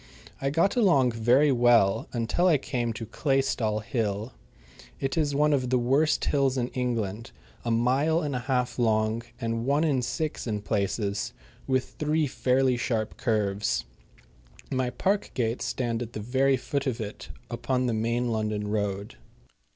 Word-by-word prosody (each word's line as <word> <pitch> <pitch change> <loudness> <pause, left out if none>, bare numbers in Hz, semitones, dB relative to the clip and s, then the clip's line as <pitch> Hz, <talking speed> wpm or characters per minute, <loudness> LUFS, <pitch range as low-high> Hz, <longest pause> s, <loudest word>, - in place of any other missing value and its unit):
I 135 - +1
got 165 +7 +2
along 165 - +4
very 120 +6 +3
well 120 -5 +3
until 120 +9 +1
I 165 -5 +5
came 125 -3 -2
to 115 - -6
Claystall 115 -4 0
Hill. 110 -1 -2 0.7
It 135 - -2
is 150 -3 +1
one 150 +1 +3
of 130 -3 0
the 130 - +3
worst 135 +6 +2
hills 135 -2 +1
in 125 -1 -1
England, 115 -4 -2 0.3
a 120 - -2
mile 130 +8 +2
and 145 -3 -2
a - - 0
half 125 0 -1
long 110 -1 +2 0.2
and 115 -1 -2
one 145 +3 +3
in 140 -5 +2
six 135 +4 -3
in 105 -2 -2
places, 100 -1 -1 0.3
with 130 -1 -1
three 155 +1 +1
fairly 130 -1 +1
sharp 110 -2 -2
curves. 105 - 0 0.9
My 130 -1 0
park 195 +10 0
gates 115 -1 -1
stand 120 -2 -2
at 120 -1 -6
the - - -4
very 130 +5 +2
foot 140 +2 -3
of 125 -2 -1
it 105 -2 -6 0.2
upon 130 -1 -1
the 120 - 0
main 115 +2 0
London 105 -2 -2
road. 100 - -2
125 Hz, 160 wpm, -27 LUFS, 110-135 Hz, 0.9 s, I